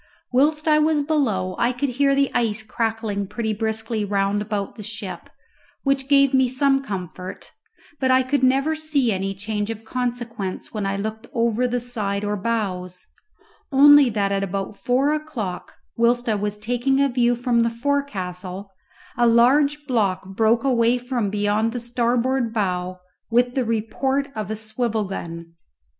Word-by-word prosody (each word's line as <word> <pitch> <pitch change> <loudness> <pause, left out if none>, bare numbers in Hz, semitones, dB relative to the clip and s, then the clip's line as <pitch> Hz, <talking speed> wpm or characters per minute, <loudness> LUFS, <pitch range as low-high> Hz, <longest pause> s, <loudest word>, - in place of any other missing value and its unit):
Whilst 300 +5 +2
I 305 -1 +5
was 305 -1 +2
below 255 -12 0
I 235 +1 +3
could 265 +3 -2
hear 275 +2 +2
the 275 -1 +2
ice 220 -3 0
crackling 220 -3 -2
pretty 220 +2 -2
briskly 220 0 -2
round 200 0 0
about 205 -1 -3
the - - -10
ship, 210 -2 -7 0.5
which 275 -1 0
gave 275 -1 +5
me 260 -1 +4
some 270 +2 +2
comfort; 185 -4 -7 0.5
but 260 - +1
I 260 0 +5
could 280 +2 0
never 270 +4 +3
see 305 -6 +1
any 195 0 -2
change 210 +1 -3
of 225 -1 -5
consequence 235 -5 -4
when 210 -3 -2
I 195 0 -1
looked 220 +3 -5
over 235 +1 +1
the 245 0 -1
side 210 -5 -2
or 205 0 -1
bows, 185 -4 -3 0.7
only 285 0 +7
that 205 -3 0
at 195 0 0
about 195 +1 -3
four 260 +7 +1
o'clock, 255 -13 -5 0.2
whilst 240 +1 +2
I 220 - +2
was 210 0 -2
taking 245 +5 0
a 280 - +4
view 245 -2 +2
from 240 0 +1
the 230 0 +3
forecastle, 200 -8 -3 0.5
a 240 0 +4
large 280 +6 +4
block 200 -8 0
broke 225 +2 +3
away 245 -2 +3
from 245 -4 -2
beyond 210 +2 0
the 245 - -3
starboard 240 +1 0
bow 185 -4 -2 0.3
with 245 +1 +2
the 260 - 0
report 265 +5 -1
of 215 -2 -4
a 220 - -2
swivel 220 +1 -2
gun. 170 -3 -7
230 Hz, 160 wpm, -22 LUFS, 205-260 Hz, 0.7 s, only